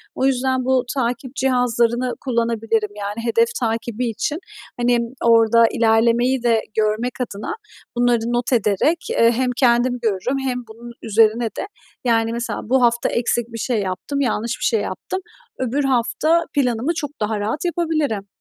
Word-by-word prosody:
O 260 - 0
yüzden 260 -1 +1
bu 260 -1 +2
takip 250 +1 -2
cihazlarını 245 -1 +1
kullanabilirim; 230 -3 0
yani, 205 0 -4
hedef 230 0 +3
takibi 230 0 -2
için, 255 +8 -2 0.4
hani, 240 0 +2 0.3
orada 230 0 +5
ilerlemeyi 235 +3 +2
de 230 -2 +3 0.2
görmek 220 +3 +1
adına 215 - -4 0.4
bunları 245 -1 +3
not 240 +2 0
ederek, 225 - +2
eee, 230 0 +4
hem 250 +2 0
kendim 245 0 +3
görürüm 225 +4 0
hem 260 -2 -2
bunun 230 +2 -11
üzerine 225 +2 +3
de, 225 - -4 0.4
yani, 225 -1 +2
mesela 235 -2 -3
bu 260 +1 +3
hafta 235 0 +2
eksik 240 0 -1
bir - - -4
şey 240 -2 0
yaptım, 200 +9 -3
yanlış 235 -2 -1
bir - - -2
şey 225 -3 +2
yaptım, 375 - -4 0.4
öbür 260 +3 0
hafta 270 +6 +2
planımı 250 +1 +1
çok 290 -3 -3
daha 210 0 -1
rahat 220 - -2
yapabilirim. 310 - -1
235 Hz, 150 wpm, -20 LUFS, 225-255 Hz, 0.4 s, orada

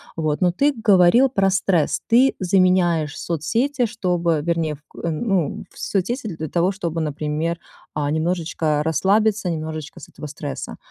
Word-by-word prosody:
Вот, 155 -2 -1
но 180 -1 +4
ты 285 +11 +2
говорил 205 +6 +5
про 195 -6 +2
стресс, 190 -4 +1
ты 255 +4 +4
заменяешь 180 -5 +2
соцсети, 235 - 0
чтобы 180 -7 0
вернее 165 -1 -1
в 145 - -22
к - - -24
ну, 170 -1 -1
в - - -21
соцсети 220 +6 -2
для 155 0 -5
того, 175 +4 +1
чтобы, 170 -3 -3
например, 155 +2 -2 0.3
а 145 -1 -1
немножечко 160 -1 0
расслабиться, 195 +5 +1
немножечко 155 -1 -5
с - - -12
этого - - -10
стресса. 145 -1 -6
170 Hz, 150 wpm, -21 LUFS, 155-195 Hz, 0.3 s, говорил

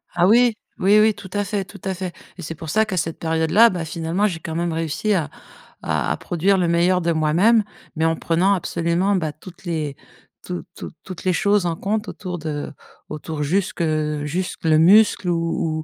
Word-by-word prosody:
Ah 175 +1 +4
oui, 235 +2 +5 0.3
oui, 205 +3 +5
oui, 215 0 +4
tout 190 - -11
à 205 0 0
fait, 200 0 -3
tout - - -14
à 190 -1 -2
fait 185 -1 -5 0.2
et - - -8
c'est 165 0 -6
pour 160 0 -8
ça 220 +6 +3
qu'à 190 -4 -4
cette 165 0 -2
période-là, 165 +8 +4
bah, 175 -5 -4
finalement, 165 +5 -1
j'ai 170 -5 -4
quand 160 -1 -6
même 170 -1 -1
réussi 165 +6 -1
à 165 -7 0 0.5
à - - -1
produire 190 +3 +1
le 180 -2 +1
meilleur 175 +2 +2
de 170 0 +1
moi-même. 170 +9 +3 0.3
Mais 160 - -1
en 165 - +2
prenant 180 +5 +2
absolument, 175 +3 0
bah, 160 -5 -1
toutes 175 +4 -14
les 155 -5 -3 0.5
tout 180 -1 -5
toutes - - -9
toutes 185 -3 -9
les 185 - +2
choses 200 +2 +2
en 165 - -1
compte 210 +5 -2
autour 180 -3 -6
de 150 -2 -4 0.4
autour 155 0 -5
jusque 190 +4 0 0.4
jusque 180 +5 -4
le 155 -1 +4
muscle 195 +1 +5
ou 165 -2 -1
175 Hz, 195 wpm, -21 LUFS, 160-195 Hz, 0.5 s, oui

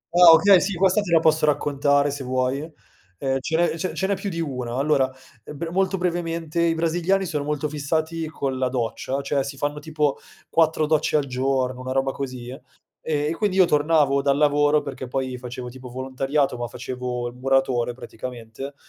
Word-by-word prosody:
Ah, 175 -1 +9
okay, 175 +3 +7
sì, 195 0 -1
questa 190 +3 +3
te 195 -4 -5
la 165 - +6
posso 160 -1 +3
raccontare 145 0 +2
se 140 -1 -5
vuoi, 130 +1 0 0.6
ehm, 135 +2 -1
ce 160 +4 -1
n'è 170 -1 +1
ce 185 +3 -3
ce 190 - -1
n'è 200 - +1
più 200 - -4
di 170 -3 -5
1. 125 -6 -3
Allora, 135 -1 +2 0.4
bre 165 +3 -5
molto 190 +1 +1
brevemente, 170 -2 -2
i 165 -1 +2
brasiliani 175 +4 +1
sono 155 -5 -2
molto 150 0 -2
fissati 160 +2 -2
con 135 -4 -3
la 130 - +1
doccia, 130 +2 -2
cioè 140 -1 0
si 140 0 -7
fanno 145 +1 -2
tipo 150 -2 -1 0.3
4 160 -1 +3
docce 155 0 +2
al 145 - 0
giorno, 130 -1 -1
una 130 0 -4
roba 135 0 +1
così, 125 -2 -6 0.5
e 150 0 0
quindi 205 -3 0
io 185 - +7
tornavo 145 -3 +3
dal 140 0 +2
lavoro, 145 0 +3
perché 135 -2 -6
poi 130 0 -3
facevo 125 0 -7
tipo 125 +1 -10
volontariato 135 +2 -1
ma 120 0 -3
facevo 125 0 -4
il - - -13
muratore 130 -1 +1
praticamente, 125 +2 -8
145 Hz, 185 wpm, -23 LUFS, 130-165 Hz, 0.6 s, Ah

